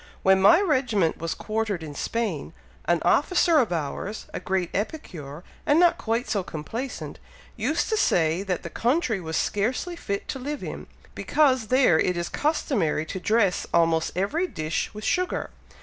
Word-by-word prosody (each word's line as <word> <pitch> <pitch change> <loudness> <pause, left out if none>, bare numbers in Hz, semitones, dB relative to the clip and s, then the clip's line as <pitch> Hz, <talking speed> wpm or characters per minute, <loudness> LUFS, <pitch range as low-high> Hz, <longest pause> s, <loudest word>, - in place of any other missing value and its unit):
"When 190 0 +5
my 205 - +7
regiment 250 - +1
was 165 -1 -3
quartered 215 -5 -2
in 150 -2 -7
Spain, 230 +9 -3 0.3
an - - +1
officer 345 -3 +4
of 235 -8 +1
ours, 170 +6 -3
a - - -3
great 185 -2 -1
epicure, 175 - -5 0.2
and 295 +3 +3
not 345 -1 +4
quite 230 +2 -1
so 205 - 0
complaisant, 225 - -6 0.4
used 315 +3 0
to 440 - +1
say 165 - +2
that 190 -3 -3
the 170 - -7
country 240 - 0
was 160 -1 -3
scarcely 250 - -1
fit 200 -11 -4
to 265 - -3
live 290 +3 -4
in, - - -6 0.3
because 260 -6 +2
there 255 -11 +4
it 180 -1 +1
is 170 0 -2
customary 230 - 0
to 185 - -5
dress 205 -1 +1
almost 165 -1 +2
every 310 - 0
dish 155 - -3
with 210 0 -9
sugar. 365 0 -1
210 Hz, 165 wpm, -25 LUFS, 170-275 Hz, 0.4 s, my